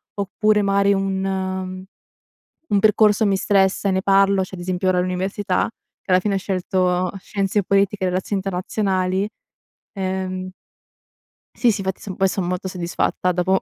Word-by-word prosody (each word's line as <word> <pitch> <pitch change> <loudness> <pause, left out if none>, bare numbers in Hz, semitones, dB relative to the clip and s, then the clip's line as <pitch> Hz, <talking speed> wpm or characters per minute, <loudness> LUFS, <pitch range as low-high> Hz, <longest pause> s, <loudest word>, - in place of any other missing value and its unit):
Oppure 210 +1 +1
magari 200 0 +3
un 190 -1 -2 0.9
un 200 - +4
percorso 210 0 +4
mi 195 -1 +2
stressa 195 0 +2
e - - +2
ne 190 0 +1
parlo, 195 -1 +4
cioè 185 - -8
ad 175 - -8
esempio 185 +1 -1
ora 180 -1 +2
all'università, 185 +2 -1 0.3
che 190 - -5
alla 185 - +6
fine 200 +1 -1
ho - - +2
scelto 185 -1 0
scienze 200 +1 -1
politiche 200 +1 +1
e - - +2
relazioni 190 +2 -1
internazionali, 190 0 -1 0.7
ehm 185 -1 -3 1.1
Sì, 245 - +3
sì, 200 - -3
infatti 190 0 -4
poi 195 - +2
sono 185 -2 -2
molto 180 +1 -2
soddisfatta 180 0 -1
dopo 185 +2 +2
190 Hz, 150 wpm, -21 LUFS, 185-200 Hz, 1.1 s, alla